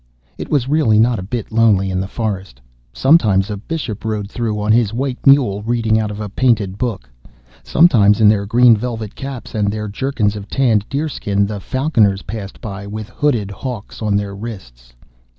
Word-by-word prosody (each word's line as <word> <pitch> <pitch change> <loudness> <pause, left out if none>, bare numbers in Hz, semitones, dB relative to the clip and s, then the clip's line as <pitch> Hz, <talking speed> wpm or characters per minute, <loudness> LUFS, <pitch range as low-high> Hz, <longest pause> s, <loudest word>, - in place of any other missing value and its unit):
It - - -6
was 140 -4 +1
really 140 -7 +3
not 115 0 +3
a - - -4
bit 110 +4 -5
lonely 105 -4 +3
in 90 - -1
the 95 - -3
forest. 95 - -4 0.3
Sometimes 105 - +3
a 105 - -3
Bishop 115 -2 -5
rode 105 -2 -3
through 110 -3 -2
on 105 +1 +1
his 115 -1 +2
white 130 +1 -3
mule, 125 -8 +4
reading 115 -1 +1
out 110 -1 -1
of 105 0 -7
a 105 - -4
painted 105 -3 0
book. 110 - -3 0.5
Sometimes 115 -11 +4
in 110 - +5
their 100 -1 +3
green 120 +2 +5
velvet 110 -2 -5
caps, 135 -3 -7
and 105 -2 0
their 105 0 -4
jerkins 105 -1 -1
of 105 -1 -8
tanned 115 -6 +1
deerskin, 135 -9 -1
the 105 0 -5
falconers 110 - +1
passed 100 -1 -7
by, 100 -2 -7
with 110 +1 -6
hooded 120 -9 -1
hawks 115 +1 -7
on 105 -2 0
their 100 -1 -4
wrists. 65 - -9
110 Hz, 185 wpm, -18 LUFS, 100-120 Hz, 0.5 s, in